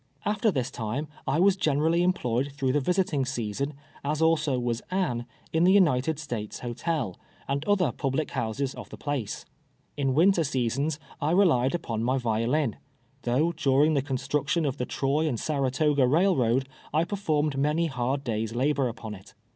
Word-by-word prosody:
After 215 +2 +2
this 130 - -1
time 125 +5 -3 0.2
I 150 - +1
was 190 +1 +5
generally 160 0 +2
.employed 140 -7 0
through 135 -2 0
the 145 - +2
visiting 175 -2 +1
season, 130 +3 -3 0.3
as 150 +2 -1
also 160 -4 +2
was 120 -1 -1
Anne, 125 -11 -1 0.3
in 160 +1 +3
the 180 - +6
United 160 -6 +3
States 120 -9 -5
Hotel, 120 - -2 0.3
and 140 +1 -1
other 200 -4 +2
public 135 +2 -2
houses 130 +4 -2
of - - -9
the - - -9
place. 140 -8 -3 0.5
In 135 -2 +1
winter 175 +2 +4
seasons 135 +2 -1 0.2
I 150 - +1
re 190 +4 +5
lied 130 -3 +2
upon 115 -9 -3
my 130 +3 +1
violin, 120 +2 0 0.4
though 130 +8 +1
during 150 -1 +3
the 140 - +2
construction. 140 +4 -1
of 140 -1 -1
the 125 - -3
Troy 145 +4 0
and 125 -7 -1
Saratoga 140 -1 +1
railroad, 135 -6 +2 0.2
I 155 +2 +2
performed 155 -7 0
many 150 +4 +1
hard 135 -1 -1
days' 115 -2 -2
labor 135 +1 +1
upon 115 -2 -6
it. 95 -1 -13
140 Hz, 165 wpm, -27 LUFS, 125-160 Hz, 0.5 s, the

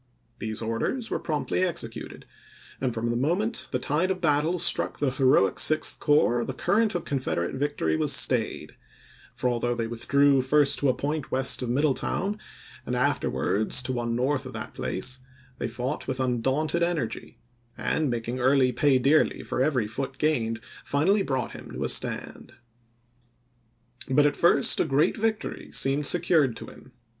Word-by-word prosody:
These 110 0 -3
orders 115 - -2
were - - -1
promptly 155 +3 -2
executed, 170 -11 -5 0.6
and 130 -2 0
from 115 +1 -2
the - - -1
moment 180 - -1
the 125 - -1
tide 150 +8 0
of 190 -1 -1
battle 155 +2 +1
struck 175 - 0
the 140 -3 0
heroic 130 -8 +3
Sixth 155 0 +2
Corps 120 -5 +3
the 130 - -5
current 215 -1 +1
of 175 -1 -3
Confederate 130 -11 -2
victory 135 - -1
was - - 0
stayed; - - 0 0.6
for 125 - -1
although 120 0 0
they 115 -1 -2
withdrew 135 +4 +2
first 145 +2 +2
to 140 - +2
a 130 - +2
point 145 +1 -3
west 130 0 +1
of 125 - -3
Middletown, 155 - 0 0.4
and 125 - -3
afterwards 125 -5 0
to 130 - -3
one 120 -1 -2
north 130 +2 0
of 130 - -10
that 110 -1 -7
place, 95 - -2 0.4
they - - -2
fought 125 +5 -4
with 130 -1 -3
undaunted 130 +6 0
energy, 155 -10 -2 0.4
and, 155 -3 0
making 120 +1 -3
Early 130 0 +3
pay 145 0 +3
dearly 140 +5 +2
for - - -2
every 130 -5 +1
foot 130 +6 -5
gained, 115 -7 0 0.2
finally 185 +9 +2
brought 130 -8 -2
him - - -10
to - - -4
a - - -1
stand. - - -2 1.5
But 145 +2 +4
at 145 - +2
first 170 - +4
a - - +3
great 145 0 +2
victory 220 0 -2
seemed 135 +1 +1
secured 160 -8 +2
to - - -8
him. 130 - -15
135 Hz, 165 wpm, -26 LUFS, 120-155 Hz, 1.5 s, But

